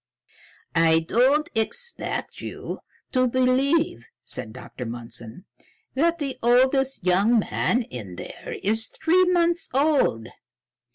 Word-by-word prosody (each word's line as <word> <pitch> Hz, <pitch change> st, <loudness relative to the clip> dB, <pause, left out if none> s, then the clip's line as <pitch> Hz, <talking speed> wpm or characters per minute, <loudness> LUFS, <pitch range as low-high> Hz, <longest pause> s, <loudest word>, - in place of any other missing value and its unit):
"I 165 Hz, 0 st, +4 dB
don't 265 Hz, -, +2 dB
expect 475 Hz, -, -3 dB
you -, -, -6 dB, 0.3 s
to 255 Hz, 0 st, +3 dB
believe," 255 Hz, -, +1 dB, 0.2 s
said 110 Hz, -, 0 dB
Dr. 125 Hz, +1 st, -9 dB
Mundson, 115 Hz, -, -5 dB, 0.5 s
"that 335 Hz, +5 st, +2 dB
the 275 Hz, -5 st, -4 dB
oldest 260 Hz, -1 st, +2 dB
young 200 Hz, +6 st, +4 dB
man 235 Hz, +3 st, +1 dB
in 110 Hz, -, -8 dB
there -, -, -8 dB
is 220 Hz, +3 st, +1 dB
three 350 Hz, +3 st, +2 dB
months 345 Hz, -1 st, +1 dB
old. 275 Hz, -, +2 dB
250 Hz, 110 wpm, -24 LUFS, -, 0.5 s, I